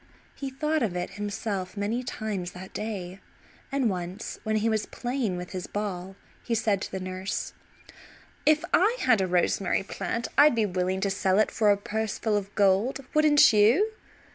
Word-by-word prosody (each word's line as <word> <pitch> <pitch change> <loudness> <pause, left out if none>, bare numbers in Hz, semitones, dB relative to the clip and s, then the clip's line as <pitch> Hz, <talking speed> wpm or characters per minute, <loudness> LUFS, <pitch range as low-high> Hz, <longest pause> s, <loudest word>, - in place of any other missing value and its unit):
He 275 - -5
thought 305 +4 -1
of 205 -7 -1
it 180 +2 -3
himself 205 -1 -4
many 210 +5 -1
times 210 -7 -4
that 185 +1 -10
day, 195 -4 -5 0.5
and 275 -3 +1
once, 185 0 -4
when 215 0 -1
he 215 +1 +1
was 220 -1 0
playing 245 -7 -2
with 180 0 -7
his 185 -2 -5
ball, 195 -2 -4 0.3
he 235 - -1
said 215 -3 +1
to - - -5
the 190 - -3
nurse: 185 +1 -4 0.9
"If 310 0 +3
I 425 +8 +4
had 235 -6 +4
a 190 - +1
rosemary 180 +2 +1
plant 230 +3 -3
I'd 290 -3 +7
be 225 -2 +2
willing 185 0 -1
to 200 -1 +1
sell 190 -1 +1
it 215 - +3
for 215 -2 +2
a 200 - +5
purse 215 +1 -3
full 220 -2 0
of 205 -1 -3
gold. 205 +7 +2
Wouldn't 300 -5 +6
you?" 235 - +4
205 Hz, 180 wpm, -27 LUFS, 190-235 Hz, 0.9 s, I'd